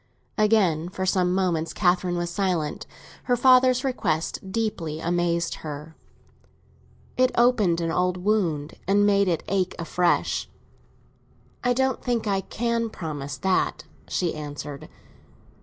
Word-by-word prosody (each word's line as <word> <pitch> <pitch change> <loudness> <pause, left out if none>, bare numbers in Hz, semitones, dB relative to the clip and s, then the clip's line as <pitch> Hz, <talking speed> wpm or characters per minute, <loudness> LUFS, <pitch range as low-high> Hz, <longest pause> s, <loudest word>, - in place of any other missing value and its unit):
Again, 195 -7 +2
for 185 0 -3
some 185 -1 +2
moments, 175 -4 0
Catherine 180 -1 +1
was 175 0 -2
silent; 175 -5 -1 0.4
her 245 - +2
father's 255 0 +5
request 190 - -2
deeply 195 -8 -2
amazed 170 0 0
her; 155 +1 -7 1.2
it 255 0 +4
opened 230 -8 +3
an 165 0 -1
old 180 +1 +1
wound 180 -7 -1
and 205 +1 +4
made 200 -1 +3
it 170 -3 0
ache 190 -1 0
afresh. 175 +1 0 1.1
"I 245 0 +3
don't 265 +1 0
think 240 -3 -1
I 195 -2 +1
can 230 +3 -1
promise 145 -8 -5
that," 185 -2 0 0.2
she 175 -3 -1
answered. 145 -1 -7
180 Hz, 125 wpm, -25 LUFS, 165-215 Hz, 1.2 s, father's